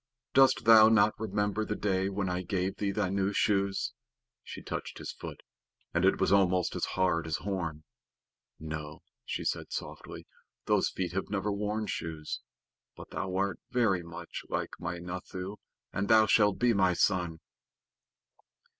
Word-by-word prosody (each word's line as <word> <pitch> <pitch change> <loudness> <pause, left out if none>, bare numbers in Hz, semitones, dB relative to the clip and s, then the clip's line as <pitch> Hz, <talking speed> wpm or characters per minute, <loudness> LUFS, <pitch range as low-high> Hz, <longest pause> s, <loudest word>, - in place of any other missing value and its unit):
"Dost 135 0 +5
thou 110 -1 +9
not 110 -1 +5
remember 105 -1 -1
the 105 - -2
day 95 -2 0
when 100 0 -2
I 90 0 -1
gave 95 +1 -2
thee 100 - -1
thy 100 -1 0
new 100 +1 0
shoes?" 100 -2 +1 0.5
She - - -9
touched - - -5
his - - -5
foot, - - -9 0.5
and 85 - +1
it 95 - +4
was 95 - +2
almost 95 -3 +3
as - - 0
hard 90 -3 +2
as 80 - -1
horn. 85 -6 -3 0.8
"No," 75 -1 -6 0.2
she - - -4
said - - -2
sorrowfully, - - -6 0.4
"those - - +2
feet 90 -3 -3
have 95 +2 -3
never 105 0 -1
worn 105 +2 -2
shoes, 80 -5 -4 0.6
but - - -11
thou 95 -1 -3
art 100 0 0
very 110 -8 +2
like 85 0 -5
my 85 - -4
Nathoo, 90 +3 -6 0.4
and 100 +1 -1
thou 110 0 +6
shalt 105 -2 +4
be 120 -1 +3
my 95 -3 +3
son." 85 -4 +1
95 Hz, 155 wpm, -30 LUFS, 90-105 Hz, 0.8 s, thou